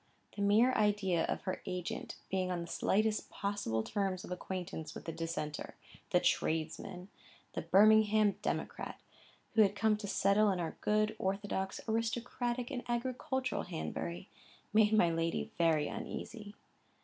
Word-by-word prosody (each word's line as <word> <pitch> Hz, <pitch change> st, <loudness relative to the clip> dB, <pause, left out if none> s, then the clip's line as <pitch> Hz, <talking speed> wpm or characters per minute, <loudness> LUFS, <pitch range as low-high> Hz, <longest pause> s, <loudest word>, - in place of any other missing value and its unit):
The 205 Hz, -, -4 dB
mere 215 Hz, +6 st, +5 dB
idea 205 Hz, -6 st, +2 dB
of -, -, -2 dB
her 185 Hz, -, -3 dB
agent 180 Hz, -1 st, -4 dB, 0.2 s
being 185 Hz, -1 st, 0 dB
on 180 Hz, -1 st, -1 dB
the -, -, -4 dB
slightest 215 Hz, +5 st, +1 dB
possible 200 Hz, -, -1 dB
terms 195 Hz, -, -1 dB
of -, -, -9 dB
acquaintance 180 Hz, -3 st, -5 dB
with -, -, -8 dB
the 165 Hz, -, -3 dB
Dissenter, 165 Hz, -2 st, -4 dB, 0.3 s
the -, -, +4 dB
tradesman, 165 Hz, +4 st, -1 dB, 0.4 s
the -, -, -2 dB
Birmingham 215 Hz, +1 st, +5 dB
democrat, -, -, -3 dB, 0.5 s
who 220 Hz, -, +6 dB
had 205 Hz, -1 st, +4 dB
come 215 Hz, +1 st, +3 dB
to 210 Hz, -1 st, -6 dB
settle 200 Hz, +2 st, +3 dB
in 185 Hz, -, -1 dB
our 165 Hz, -2 st, -3 dB
good, 215 Hz, 0 st, +2 dB
orthodox, 190 Hz, 0 st, -2 dB
aristocratic, 240 Hz, +2 st, -1 dB
and 250 Hz, -3 st, -2 dB
agricultural 255 Hz, +2 st, -1 dB
Hanbury, 80 Hz, +2 st, -4 dB, 0.5 s
made 215 Hz, -1 st, +5 dB
my 210 Hz, -6 st, +5 dB
lady 165 Hz, 0 st, -1 dB
very 160 Hz, -3 st, +3 dB
uneasy. 210 Hz, -3 st, -6 dB
200 Hz, 140 wpm, -34 LUFS, 175-220 Hz, 0.5 s, who